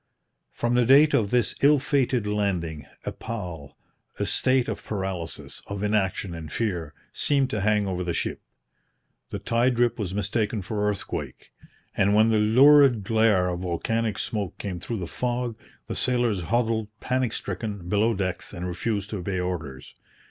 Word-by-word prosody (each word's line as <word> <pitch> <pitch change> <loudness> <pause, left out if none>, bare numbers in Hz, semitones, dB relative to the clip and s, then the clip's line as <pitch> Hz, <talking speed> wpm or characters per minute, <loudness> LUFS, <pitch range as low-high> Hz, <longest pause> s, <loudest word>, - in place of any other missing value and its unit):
From 120 0 -1
the 125 0 +4
date 140 +5 +6
of 105 -4 +2
this 120 -2 +2
ill 145 +2 +6
fated 130 -4 +1
landing, 90 -8 -2 0.2
a - - -2
pall 90 -11 -7 0.4
a - - -1
state 130 -1 +2
of - - -4
paralysis, 95 -5 -4
of 100 0 -4
inaction 100 -3 0
and 80 -3 -7
fear 85 -10 -2 0.2
seemed 140 -3 +1
to 105 - -1
hang 105 0 +2
over 90 -2 -2
the 90 - -2
ship. - - -3 0.9
The - - -4
tide 120 +1 +1
rip 120 0 +2
was 95 -2 -3
mistaken 105 +1 -1
for 105 +2 -1
earthquake; 100 -3 -5 0.4
and 100 +1 +3
when 110 +1 +5
the 110 - +3
lurid 130 +1 +6
glare 110 -3 +3
of 90 -1 -3
volcanic 105 +5 -1
smoke 105 -5 -3
came 95 -4 -5
through 115 - -4
the 90 - -4
fog, 120 +5 -2 0.3
the - - -5
sailors 120 -6 +1
huddled 115 -2 +1
panic 130 -2 0
stricken 100 -2 -5
below 105 +4 +2
decks 95 -2 -3
and 85 - -5
refused 100 +3 -2
to 105 - -2
obey 95 0 -3
orders. 80 -7 -5
105 Hz, 165 wpm, -25 LUFS, 95-120 Hz, 0.9 s, date